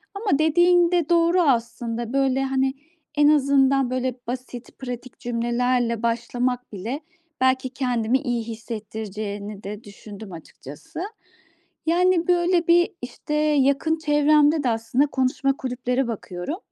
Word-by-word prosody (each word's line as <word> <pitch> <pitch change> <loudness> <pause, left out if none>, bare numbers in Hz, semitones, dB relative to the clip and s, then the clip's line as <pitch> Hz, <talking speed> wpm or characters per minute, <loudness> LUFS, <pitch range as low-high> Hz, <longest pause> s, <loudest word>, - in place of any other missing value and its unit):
ama 400 -8 0
dediğin 345 +2 +4
de 345 -4 +1
doğru 340 +1 +4
aslında. 235 -4 -1
Böyle, 270 -1 +2
hani, 265 0 0 0.4
en 295 0 +5
azından, 275 -2 +3
böyle 255 -1 -1
basit, 250 0 -7
pratik 250 -1 -7
cümlelerle 240 0 0
başlamak 245 +1 -1
bile, 225 +9 -4 0.4
belki 260 0 +2
kendimi 250 -2 0
iyi 240 -3 -2
hissettireceğini 215 -2 -6
de 210 +3 -7
düşündüm 205 0 -11
açıkçası. 160 - -10 0.9
Yani 345 0 +3
böyle, 350 -1 +2
bir, 345 +2 +5
işte, 245 +4 -6
yakın 300 +1 +2
çevremde 300 0 +3
de 250 - +2
aslında 230 +5 +1
konuşma 265 0 0
kulüplere 250 0 -2
bakıyorum. 205 - -5
255 Hz, 120 wpm, -23 LUFS, 230-295 Hz, 0.9 s, en